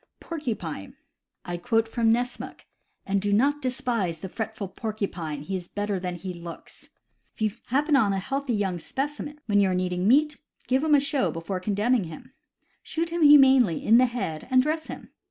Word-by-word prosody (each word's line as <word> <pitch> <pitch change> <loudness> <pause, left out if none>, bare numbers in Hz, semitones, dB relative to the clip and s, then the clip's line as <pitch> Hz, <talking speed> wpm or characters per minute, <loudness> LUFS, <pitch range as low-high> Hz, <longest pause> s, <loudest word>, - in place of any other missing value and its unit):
Porcupine. 215 - -5 0.3
— - - -56
I 175 0 -3
quote 225 +4 +1
from 225 0 +2
Nessmuk: 245 +2 -2 0.4
"And 195 0 0
do 205 +1 -1
not 280 +8 +2
despise 240 - -1
the 185 +4 -7
fretful 220 -1 -4
porcupine; 185 -8 -4
he 190 +5 -4
is 180 -2 -5
better 205 -1 -2
than 180 -1 -4
he 180 +1 -6
looks. 170 -1 -11 0.5
If - - -18
you 215 - +2 0.2
happen 290 +4 +2
on 220 -7 +4
a 195 - 0
healthy 270 +6 -2
young 190 -4 -1
specimen 290 - -4
when 205 -2 +2
you 195 -1 +4
are 185 - 0
needing 180 0 -1
meat, 295 +5 +4 0.3
give 260 +3 +2
him 310 -2 +4
a - - +6
show 280 -1 0
before 165 +3 -4
condemning 210 +3 +1
him. 160 -1 -11 0.5
Shoot 330 +1 -3
him 340 0 -2
humanely 270 - +6
in 225 +3 +6
the 255 - +5
head, 195 -11 -4
and 255 0 +5
dress 310 +2 -2
him. - - -9
220 Hz, 190 wpm, -26 LUFS, 185-270 Hz, 0.5 s, a